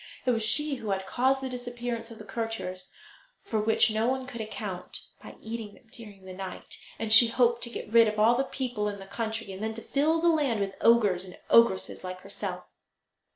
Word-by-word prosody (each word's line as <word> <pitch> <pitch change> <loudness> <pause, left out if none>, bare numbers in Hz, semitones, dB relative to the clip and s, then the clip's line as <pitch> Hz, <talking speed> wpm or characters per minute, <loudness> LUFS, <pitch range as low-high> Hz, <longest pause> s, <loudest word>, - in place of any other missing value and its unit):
It 255 - +3
was 230 -2 0
she 290 +6 +1
who 220 - -6
had 190 -1 -1
caused 260 +6 +1
the 265 - -3
disappearance 245 -2 -5
of 230 - -11
the 215 - -10
courtiers, 225 -5 -5 0.5
for 220 - -2
which 220 +1 +3
no 220 +2 0
one 260 0 -1
could 245 -3 -7
account, 205 -4 -5 0.2
by - - -11
eating 220 -2 -6
them - - -22
during 210 -6 -11
the 185 - -8
night, 190 0 -8 0.2
and 220 -1 +1
she 230 +2 +10
hoped 235 0 +2
to - - -7
get 225 -2 -8
rid 230 -1 +7
of 215 0 -2
all 220 +3 +5
the 265 - +1
people 245 -6 -3
in 205 -1 -4
the 195 - -10
country, 220 0 -4
and 190 - -8
then 220 0 -3
to 230 - -7
fill 310 +4 +1
the 340 - +2
land 285 -9 +1
with 195 -1 -2
ogres 210 -6 +4
and 185 -1 -12
ogresses 230 -6 +4
like 185 0 -6
herself. - - -5
225 Hz, 215 wpm, -28 LUFS, 205-245 Hz, 0.5 s, she